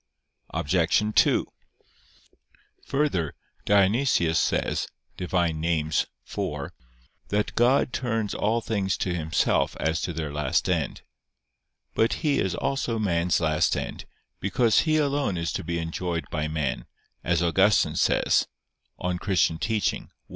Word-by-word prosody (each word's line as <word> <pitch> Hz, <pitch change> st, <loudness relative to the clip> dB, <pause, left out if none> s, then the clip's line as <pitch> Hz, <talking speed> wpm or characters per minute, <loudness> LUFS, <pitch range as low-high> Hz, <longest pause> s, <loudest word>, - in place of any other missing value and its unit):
Obj. 85 Hz, +5 st, +2 dB
2: -, -, +4 dB, 1.4 s
Further, 135 Hz, -, 0 dB, 0.3 s
Dionysius 100 Hz, -4 st, +3 dB
says -, -, 0 dB, 0.3 s
(Div. 90 Hz, -, -6 dB
Nom. 85 Hz, -3 st, +1 dB, 0.3 s
iv) -, -, +3 dB, 1.2 s
that 105 Hz, +1 st, 0 dB
"God 125 Hz, +2 st, +3 dB
turns 115 Hz, -4 st, -1 dB
all 115 Hz, +3 st, 0 dB
things 100 Hz, -4 st, -1 dB
to 90 Hz, -, -1 dB
Himself 80 Hz, -2 st, +1 dB
as 80 Hz, +1 st, 0 dB
to 90 Hz, -, -2 dB
their 80 Hz, -3 st, -4 dB
last 75 Hz, -3 st, 0 dB
end." -, -, -1 dB, 0.9 s
But 115 Hz, -, +2 dB
He 145 Hz, -2 st, +3 dB
is 95 Hz, -, 0 dB
also 135 Hz, -4 st, -1 dB
man's 90 Hz, -4 st, +1 dB
last 80 Hz, -2 st, +1 dB
end; -, -, -5 dB, 0.3 s
because 110 Hz, +4 st, +2 dB
He 155 Hz, -, +4 dB
alone 140 Hz, -, 0 dB
is 85 Hz, 0 st, -2 dB
to -, -, -3 dB
be 85 Hz, +1 st, -2 dB
enjoyed 85 Hz, +1 st, -3 dB
by 75 Hz, 0 st, -1 dB
man, 75 Hz, -4 st, -2 dB, 0.4 s
as 85 Hz, 0 st, +1 dB
Augustine 95 Hz, +5 st, +3 dB
says -, -, +2 dB, 0.5 s
(De -, -, -12 dB
Doctr. 90 Hz, -2 st, +1 dB
Christ. 110 Hz, 0 st, -1 dB
90 Hz, 125 wpm, -26 LUFS, 80-115 Hz, 1.4 s, 2